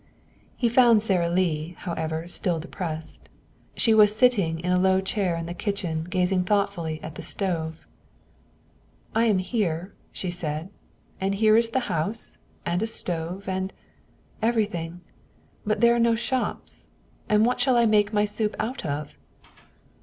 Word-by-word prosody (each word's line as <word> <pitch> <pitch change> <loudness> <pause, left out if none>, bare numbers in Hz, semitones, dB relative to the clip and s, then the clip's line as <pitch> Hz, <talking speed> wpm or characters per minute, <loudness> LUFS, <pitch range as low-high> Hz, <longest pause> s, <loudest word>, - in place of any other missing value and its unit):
He 240 - +2
found 235 -2 +5
Sara 180 -5 +2
Lee, 170 -2 0
however, 160 -2 -3
still 175 -1 0
depressed. 160 -1 -5 0.5
She 225 - +4
was 210 -1 +6
sitting 205 -9 +3
in 180 +1 -1
a 180 - +3
low 190 0 +4
chair 190 -2 -1
in 165 0 -4
the 170 - -5
kitchen 175 -4 -2
gazing 180 0 +1
thoughtfully 190 -6 0
at 155 - -6
the - - -8
stove. 165 -5 -3 1.3
"I 230 +1 +3
am 215 -4 +3
here," 185 -3 -1 0.2
she 185 - -3
said. 160 -1 -3 0.5
"And 195 +1 0
here 215 +1 +4
is 230 0 +4
the 260 +3 0
house, 210 +1 -3 0.3
and 175 +2 0
a 225 - 0
stove, 180 -2 -4
and 190 0 -2 0.7
everything. 205 -7 -1 0.7
But 210 0 +1
there 235 0 +6
are 235 - +1
no 230 0 +4
shops; 250 +2 -3 0.4
and 210 +1 +4
what 245 - +1
shall 260 -3 +3
I 235 - +5
make 210 -1 +3
my 210 -1 +2
soup 210 +1 -2
out 235 +5 -3
of?" 145 -2 -4
190 Hz, 155 wpm, -25 LUFS, 170-220 Hz, 1.3 s, was